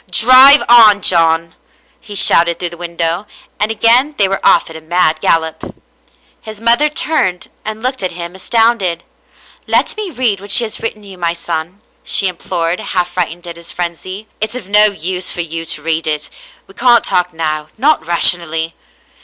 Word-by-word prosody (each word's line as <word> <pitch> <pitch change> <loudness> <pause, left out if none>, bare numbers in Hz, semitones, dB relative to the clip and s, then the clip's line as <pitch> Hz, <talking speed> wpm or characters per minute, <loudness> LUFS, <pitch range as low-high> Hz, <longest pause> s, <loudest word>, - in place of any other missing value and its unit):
" - - -33
Drive 260 +4 +7
on, 215 -4 +6
John," 165 -1 +2 0.5
he 205 -3 -11
shouted 170 -3 +3
through 175 -2 -4
the - - -9
window, 170 +2 -4 0.3
and 210 - 0
again 240 +6 +2
they 200 - +2
were 195 0 -4
off 170 - +3
at 165 - -11
a 160 - -9
mad 160 -1 0
gallop. 160 -1 -1 0.7
His 215 -2 -10
mother 235 +6 +3
turned 295 - -2
and 215 +1 -7
looked 255 -1 -3
at 185 -2 -3
him 170 0 -7
astounded. 195 -3 0 0.3
" - - -27
Let - - 0
me 425 -3 -5
read 240 - -2
what 200 - -12
she 220 +4 +4
has 220 - -4
written 215 -2 -6
you, 195 -2 -13
my 170 -1 -1
son," 170 +3 -6 0.2
she 195 - 0
implored, 170 -1 -3
half 180 -1 -2
frightened 175 -1 -4
at 170 -1 -8
his 170 0 -10
frenzy. 185 +4 -6
" - - -42
It's 220 +2 -3
of 225 -7 -8
no 210 +1 +5
use 185 -2 -3
for 175 - -4
you 165 0 -6
to 150 -2 -3
read 160 0 -2
it. 150 -1 -3 0.3
We - - -18
can't 240 -2 +3
talk 180 0 -1
now, 155 -2 -4
not 290 - +1
rationally." 165 -1 +1
180 Hz, 185 wpm, -14 LUFS, 170-220 Hz, 0.7 s, Drive